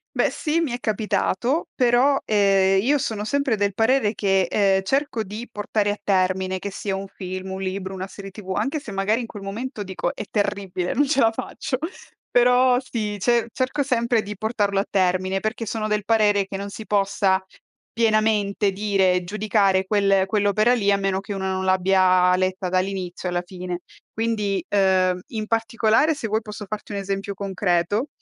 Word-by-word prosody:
Beh - - +3
sì, 320 +1 -1
mi 315 -7 -1
è 245 - -2
capitato, 225 - 0
però, 255 +3 +3
ehm, 195 -2 +3
io 285 +6 +3
sono 220 -6 -3
sempre 280 -2 0
del 200 0 0
parere 225 +1 +2
che, 195 -2 +2
ehm, 195 +1 +2
cerco 265 +2 0
di 215 +4 -7
portare 210 -1 -1
a 205 - -3
termine, 185 -1 +1
che 200 - -5
sia 195 0 -3
un 195 +1 -4
film, 185 0 -6
un 190 0 -5
libro, 190 0 -4
una 190 0 -5
serie 195 0 -10
TV, 190 -1 -7
anche 270 +10 -1
se 230 -8 -8
magari 195 +4 +1
in - - -5
quel 205 -3 -10
momento 215 +3 -5
dico: 190 -2 -3
"È - - -5
terribile, 200 -4 -1
non 285 +2 +2
ce 275 -1 +2
la 225 -3 +4
faccio"; 255 +3 -4 0.5
però 250 +1 +4
sì, 225 -5 -3
ce 235 +2 +2
cerco 265 +3 -1
sempre 235 -3 +1
di 210 -1 -7
portarlo 205 -2 0
a - - -1
termine, 185 0 +1
perché 220 +2 -3
sono 215 0 -3
del 210 -1 0
parere 210 -2 +3
che 195 0 -6
non 200 0 -5
si 215 +2 -8
possa 195 -2 +1 0.5
pienamente 215 -3 +2
dire, 190 -2 +1
giudicare 200 -1 +1
quel 195 -2 +3
quell'opera 215 +3 +2
lì 200 -4 +2
a - - +4
meno 195 -1 0
che 205 +1 -7
una 190 -1 -2
non 190 0 -2
l'abbia 185 -1 +4
letta 185 0 -1
dall'inizio 185 -1 -2
alla 175 0 -1
fine. 180 -1 -6 0.3
Quindi, 210 -5 -1
ehm, 185 -2 +2
in 215 -2 -4
particolare 225 +5 +2
se 235 -6 -5
vuoi 215 +1 0
posso 210 -1 -8
farti 215 0 -6
un 200 - -3
esempio 195 0 -3
concreto: 195 - 0
205 Hz, 180 wpm, -23 LUFS, 190-225 Hz, 0.5 s, la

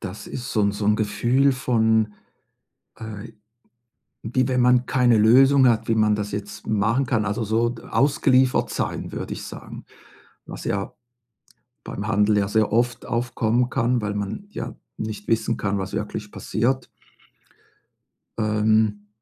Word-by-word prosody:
das 100 0 -7
ist 125 +1 -6
so 110 - +1
'n 100 - +2
so 100 0 -3
'n 105 0 +3
Gefühl 120 +6 +2
von, 110 -4 +1 0.8
äh, 110 0 -8 0.9
wie 130 +3 0
wenn 125 -1 +1
man 125 0 +4
keine 125 -3 +3
Lösung 130 +5 +6
hat, 115 -1 0
wie 115 - +3
man 110 -1 +3
das 105 0 -3
jetzt 100 0 -6
machen 110 +5 +1
kann, 115 -3 0
also, 105 +2 -1
so 110 +2 +1
d 120 - -9
ausgeliefert 130 0 +2
sein, - - -3
würde - - -5
ich - - -8
sagen. - - -9 0.6
Was - - -8
ja 100 0 -3 0.9
beim 100 +2 -6
Handel 105 0 +2
ja 100 - +1
sehr 110 +1 +1
oft 120 0 0
aufkommen 120 0 0
kann, 120 0 0
weil 105 0 -2
man 105 - -4
ja - - -6 0.2
nicht 110 -1 -6
wissen 115 0 0
kann, 100 0 -1
was 95 0 -5
wirklich 105 0 -4
passiert. 130 +4 -1 1.5
Ähm, 110 -1 +1
110 Hz, 150 wpm, -23 LUFS, 105-125 Hz, 1.5 s, Lösung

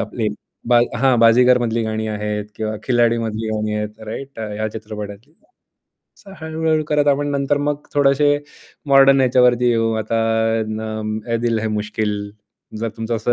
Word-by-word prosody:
आपली 110 -3 -2 0.7
हां, 130 -1 +3
बाजीगर 125 +2 +6
मधली 115 -1 -1
गाणी 110 0 -2
आहेत 105 0 -3
किंवा 110 -1 -3
खिलाडी 120 -2 +2
मधली 110 -1 -3
गाणी 105 0 -2
आहेत, 105 +1 -5
राइट 135 +1 -8 0.2
या 110 0 -1
चित्रपटातली. 105 +3 -8 0.9
असं 195 -2 -14
हळू-हळू 160 0 0
करत 150 -1 +2
आपण 145 +1 +1
नंतर 140 +1 0
मग 145 0 0 0.2
थोडेसे 145 0 +3 0.6
मॉडर्न 135 0 +6
याच्यावरती 125 -1 +3
येऊ. 115 -1 +1
आता 110 +1 -2 0.6
अ, 110 +1 -4
ए - - +3
दिल 115 -1 +1
है 110 - -2
मुश्किल 105 0 -2 0.7
जर 115 - -1
तुमचं 115 +1 -2
असं 120 +2 0
115 Hz, 150 wpm, -19 LUFS, 110-135 Hz, 0.9 s, बाजीगर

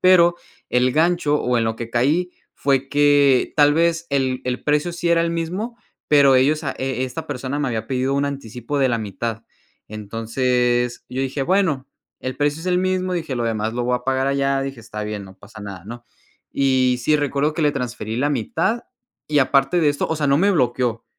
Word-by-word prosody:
Pero 175 -2 +5 0.3
el 125 +1 +2
gancho, 160 -1 +2
o 125 -1 +1
en 115 - +1
lo 110 0 -1
que 115 0 -6
caí 150 +10 +1 0.2
fue 135 -1 0
que 145 -2 +4
tal 145 -1 +5
vez 170 0 +1
el 130 -2 0
el 125 0 -3
precio 150 +3 +1
sí 170 0 -2
era 165 0 +4
el 170 - 0
mismo, 185 +8 -3 0.3
pero 140 -3 +6
ellos 150 +5 +2
a 140 - -1
e 130 -1 -2
esta 125 -1 -6
persona 130 +3 -4
me 145 - 0
había 115 -3 -3
pedido 130 0 0
un 140 0 +1
anticipo 135 0 -4
de 135 -1 +3
la 115 -2 0
mitad. 110 +2 -4 0.5
Entonces, 120 +3 -1
yo 130 +1 -3
dije: 135 +1 -2
"Bueno, 160 -5 +1 0.3
el 130 0 -4
precio 145 +2 0
es 180 - -8
el 180 -1 +2
mismo", 185 0 0
dije: 160 -6 -3
"Lo 120 - -1
demás 110 0 -2
lo 125 - -1
voy 125 0 +1
a 125 - -10
pagar 135 0 0
allá", 140 0 +1
dije: 135 -3 -6
"Está 110 -2 -7
bien, 105 -1 -5
no 95 0 -14
pasa 110 +1 -13
nada", 95 -3 -8
¿no? 120 +1 -9 0.5
Y 130 -2 +2
sí, 155 +5 +3
recuerdo 145 +1 0
que 165 - -3
le 145 -1 +3
transferí 115 -3 -4
la 140 +4 +1
mitad 160 - -1 0.5
y 150 -1 +3
aparte 135 +5 +3
de 155 - +3
esto 145 - -2
o 160 - -1
sea, 150 -1 0
no 140 +1 +4
me 200 +4 +3
bloqueó, 120 - 0
135 Hz, 210 wpm, -21 LUFS, 120-150 Hz, 0.5 s, pero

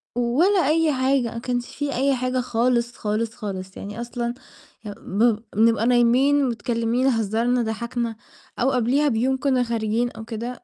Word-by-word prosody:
ولا 285 +9 +2
أي 315 -1 +2
حاجة، 260 -2 +1
ما - - -6
كانش 245 0 -3
في 285 -2 -2
أي 270 +1 +2
حاجة 255 +1 -1
خالص، 240 0 0
خالص، 220 +2 -2
خالص. 190 -3 -6
يعني 205 +4 -6
أصلًا، 240 0 -3 0.5
يب 205 - -5
بب 215 +2 +1 0.2
بنبقى 225 +1 +3
نايمين، 255 +4 +4
متكلمين، 235 +2 0
هزّرنا، 230 +1 +1
ضحكنا، 235 +1 -3 0.4
أو 265 +2 +2
قبليها 255 +4 +2
بيوم 260 +2 +1
كنّا 260 -2 +1
خارجين 230 0 -1
أو 225 - -10
كده، 240 +2 -6
240 Hz, 150 wpm, -23 LUFS, 225-260 Hz, 0.5 s, نايمين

